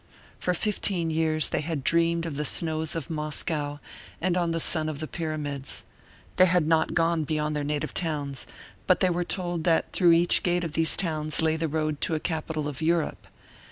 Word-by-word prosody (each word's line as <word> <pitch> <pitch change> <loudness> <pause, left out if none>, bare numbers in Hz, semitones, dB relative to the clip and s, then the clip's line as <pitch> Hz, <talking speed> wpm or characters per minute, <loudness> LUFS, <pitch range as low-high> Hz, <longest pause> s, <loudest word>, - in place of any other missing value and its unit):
For 180 - 0
fifteen 185 -4 0
years 155 -1 0
they - - 0
had 155 -3 -3
dreamed 170 +1 +2
of 160 -4 -4
the 150 - -1
snows 160 +2 0
of 165 +1 -4
Moscow 150 -1 -2 0.4
and 180 0 0
of 175 -2 +1
the 165 - -1
sun 155 -1 +1
of 155 - -5
the 155 - -4
pyramids. 150 -5 -3 0.5
They 185 0 +7
had 175 -2 +3
not 160 -1 +2
gone 165 -1 +2
beyond 150 0 -1
their 145 - -1
native 145 0 -2
towns; 145 -5 -3 0.4
but - - +4
they 185 - +3
were 175 +1 0
told 175 -2 -3
that 165 -2 +2
through 175 -3 +5
each 170 +1 +4
gate 175 0 +1
of 165 - -3
these 160 0 +3
towns 155 -3 +1
lay 160 0 +2
the 160 0 -1
road 155 -1 -2
to 165 - +2
a - - -1
capital 155 -2 -3
of 145 -1 -5
Europe. 165 0 0
160 Hz, 195 wpm, -26 LUFS, 155-170 Hz, 0.5 s, They